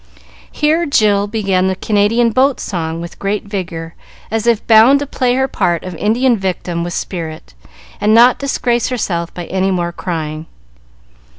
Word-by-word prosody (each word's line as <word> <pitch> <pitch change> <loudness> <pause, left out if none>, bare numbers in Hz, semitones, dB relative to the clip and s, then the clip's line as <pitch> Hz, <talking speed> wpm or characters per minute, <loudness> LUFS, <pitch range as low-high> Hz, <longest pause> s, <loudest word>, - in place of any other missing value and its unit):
Here 315 +2 +1
Jill 205 -6 +2
began 195 -4 0
the 190 - 0
Canadian 220 +4 +1
boat 260 +3 +2
song, 165 -3 -4
with 170 - -9
great 200 +1 -2
vigor, 175 -5 -5 0.4
as 225 +1 -1
if 230 -3 +2
bound 225 +5 +6
to 285 - -3
play 250 -2 0
her 265 +1 +1
part 175 -8 -1
of 185 - -6
Indian 240 +6 +1
victim 180 -2 -3
with 175 0 -4
spirit, 160 - -6 0.5
and 210 - +2
not 240 +3 +6
disgrace 245 -4 0
herself 175 -9 -2
by 175 - -5
any 190 +2 -1
more 175 -2 -1
crying. 160 -3 -5
205 Hz, 160 wpm, -16 LUFS, 175-235 Hz, 0.5 s, bound